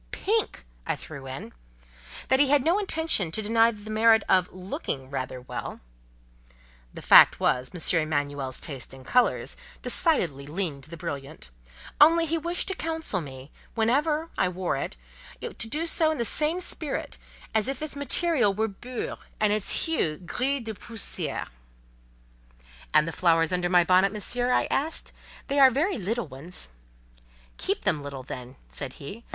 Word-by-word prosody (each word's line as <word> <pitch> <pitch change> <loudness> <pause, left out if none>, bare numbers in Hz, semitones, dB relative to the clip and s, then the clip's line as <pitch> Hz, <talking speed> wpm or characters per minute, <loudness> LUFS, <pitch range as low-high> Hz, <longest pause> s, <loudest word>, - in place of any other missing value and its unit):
pink!" 430 - -1 0.2
I - - -1
threw 140 -4 -9
in); 130 -3 -7 0.8
"that 265 - +4
he 285 - +5
had 285 -2 +4
no 345 +7 +3
intention 320 - 0
to 220 - 0
deny 225 +2 +4
it - - -4
the 215 - -6
merit 220 0 +5
of 185 -1 +3
looking 165 -7 -5
rather 130 -2 -4
well" 125 - -6 1.1
(the - - -10
fact - - +8
was, 125 0 +1
M. 170 -1 +2
Emanuel's 145 -3 -2
taste 135 -4 -6
in 130 - -13
colours 250 - +2 0.3
decidedly 165 - +3
leaned 150 -4 -4
to - - -18
the 170 - -8
brilliant); 140 - -7 0.5
"only 330 +2 +7
he 325 +1 -1
wished 340 +2 -1
to - - 0
counsel 320 - -3
me, 135 -1 -10 0.2
whenever, 295 +8 +1
I - - +3
wore 180 -2 -2
it, 135 - -4 0.4
to - - -5
do 295 +9 -3
so 325 -1 +2
in 315 - -1
the 235 - -1
same 310 +8 +2
spirit 310 -4 -3 0.3
as 220 +1 +2
if 270 - -2
its 310 -2 -3
material 285 - +1
were 220 +2 +1
'bure,' 240 +5 -6 0.2
and 210 -1 +3
its 210 -1 +1
hue 170 - 0
'gris 260 - -2
de 220 -1 -5
poussière.'" 225 +1 -4 1.4
"And 155 +1 +4
the - - -2
flowers 165 -1 +2
under 175 0 0
my 175 -1 +5
bonnet, 185 +2 +4
Monsieur?" 245 +4 0
I - - +3
asked. 305 +4 -1 0.3
"They 280 +1 0
are 265 -1 +9
very 295 - 0
little 225 +5 -2
ones—?" 140 - -6 0.9
"Keep - - -1
them 150 - +1
little, 140 -2 -7
then," 125 0 -8
said 135 -2 -5
he. 200 +12 -9
205 Hz, 165 wpm, -26 LUFS, -, 1.4 s, are